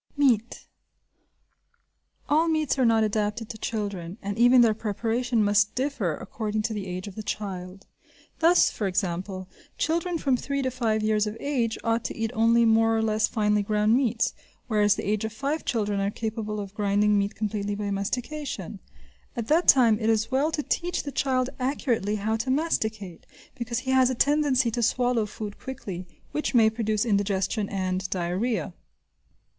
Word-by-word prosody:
Meat. 245 -5 +1 1.6
All 315 +3 +3
meats 310 -4 0
are 255 - +4
not 225 -1 +4
adapted 215 +1 -1
to 220 - -7
children, 200 -5 -4
and 200 0 -3
even 245 +2 +6
their 230 -2 +5
preparation 225 +2 -1
must 205 0 +2
differ 250 - -1
according 215 +3 -3
to 225 0 -1
the 200 -2 -4
age 185 +2 -5
of 200 - -8
the 215 - -6
child. 195 -2 -5 0.5
Thus, 335 +2 +5
for 205 - -2
example, 185 0 -2 0.3
children 335 +2 0
from 270 -5 +1
three 280 +2 -2
to 260 - -1
five 225 -4 0
years 215 0 +2
of 210 +1 -5
age 245 -6 -1
ought 230 0 +1
to - - -4
eat 225 0 -1
only 230 +1 +4
more 225 0 +4
or 220 - +1
less 215 0 +2
finely 210 -2 +1
ground 210 +1 +2
meats, 250 -4 +1 0.3
whereas 210 -3 +3
at - - -7
the 200 - 0
age 215 0 0
of 220 -1 -4
five 280 +7 -2
children 210 -7 0
are 195 0 0
capable 215 0 -4
of 200 -1 -6
grinding 205 0 +2
meat 200 0 -2
completely 205 -1 -2
by 205 0 -3
mastication; 250 +9 -4 0.6
at 235 -3 -4
that 330 +4 +3
time 230 -5 +6
it 220 -1 0
is 220 +1 +1
well 280 +5 +2
to 300 -2 -2
teach 350 +4 -1
the 285 - -5
child 260 -1 0
accurately 245 -6 0
how 215 +2 -1
to 230 +4 -3
masticate 220 - -2 0.3
because 235 -3 -4
he 260 - -2
has 260 -1 +4
a 260 - -1
tendency 275 -3 +2
to 240 - -2
swallow 240 -1 +1
food 210 -1 -7
quickly, 190 -9 -7 0.2
which 300 -3 -2
may 220 -2 +6
produce 220 -1 -1
indigestion 200 0 0
and 185 -1 -2
diarrhea. 180 +1 -1
220 Hz, 175 wpm, -26 LUFS, 205-250 Hz, 1.6 s, even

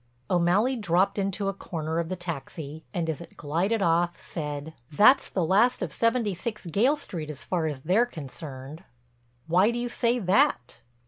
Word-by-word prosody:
O'Malley 185 +9 +3
dropped 195 -2 +1
into 195 +1 -1
a 195 - 0
corner 160 -3 -4
of 170 -1 -2
the 185 - -2
taxi 160 -2 -6
and 175 -5 -2
as 160 0 -3
it 170 - -13
glided 180 +8 0
off, 170 0 +2
said: 150 -1 -5 0.2
"That's 235 - +5
the 180 -4 0
last 205 +7 +3
of 160 -6 -4
76 225 -3 -1
Gayle 245 - +3
Street 170 - -6
as 150 -3 -8
far 170 -3 -1
as 145 -4 -4
they're 195 - +3
concerned." 145 - -8 0.6
"Why 180 +6 +4
do 235 - -2
you 240 0 -2
say 240 0 +1
that?" 185 - +1
175 Hz, 170 wpm, -27 LUFS, 160-210 Hz, 0.6 s, That's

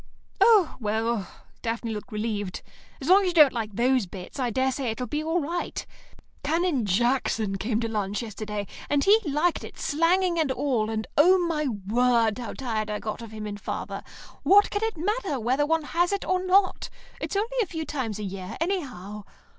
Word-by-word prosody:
"Oh, 420 -8 +5
well," 220 -2 -1 0.3
Daphne 230 0 -2
looked 210 +3 -7
relieved. 210 -3 -3 0.4
"As 270 - -6
long 380 +3 +7
as 385 - 0
you 355 - 0
don't 300 -5 +7
like 220 -4 -4
those 250 -2 +2
bits, 180 +8 -9
I 250 -2 +1
daresay 260 +3 0
it'll 235 +3 -3
be 300 +6 -2
all 325 +3 +1
right. 340 +3 -3 0.6
Canon 315 - +1
Jackson 220 -1 +1
came 220 +2 0
to 230 - -1
lunch 205 -1 -2
yesterday, 210 -1 -5 0.2
and 290 -1 +2
he 420 +3 +6
liked 310 +2 0
it, - - -10
slanging 340 +3 +2
and 305 -4 +1
all, 250 -6 0
and 220 0 -2
oh, 365 +5 +7
my 305 -3 0
word, 230 +1 +1
how 240 - -5
tired 220 -5 -3
I 210 - -1
got 215 +2 -5
of 230 - -8
him 215 0 -7
and 205 -1 -6
father! - - -4 0.4
What 405 +1 +5
can 410 - -1
it 445 -5 -1
matter 385 - -1
whether 260 +6 +1
one 325 0 +1
has 345 +4 +1
it 400 - -2
or 370 0 +1
not? 375 +1 +2 0.3
It's - - -4
only 460 +5 -1
a 420 - 0
few 320 -2 -4
times 250 -9 -3
a 210 - -5
year, 190 -1 -6
anyhow. 250 - -3
255 Hz, 190 wpm, -26 LUFS, 215-335 Hz, 0.6 s, long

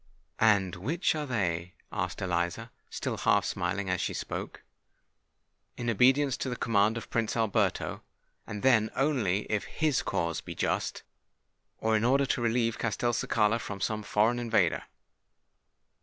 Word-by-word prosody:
"And 100 -5 +3
which 155 - 0
are 150 -2 -3
they?" 90 -7 -1 0.2
asked - - -3
Eliza, 85 -1 -1 0.2
still - - -3
half - - +3
smiling 95 +3 -2
as 90 -1 0
she - - -2
spoke. - - -5 1.1
"In 120 -1 -1
obedience 130 +4 +4
to 130 - -3
the 125 - -2
command 110 -1 +2
of 115 - -8
Prince 115 0 0
Alberto—and 105 -1 -2
then 115 -5 +4
only 125 -9 +1
if 105 -1 -2
his 155 -4 0
cause 85 -4 -1
be - - -8
just; - - -1 0.7
or 110 0 +1
in 110 - +1
order 135 +3 +3
to 125 - -1
relieve 115 -1 +1
Castelcicala 115 -1 +1
from 105 -3 -6
some 110 +2 -1
foreign 110 +4 +2
invader." 115 -8 +1
110 Hz, 140 wpm, -29 LUFS, 100-120 Hz, 1.1 s, obedience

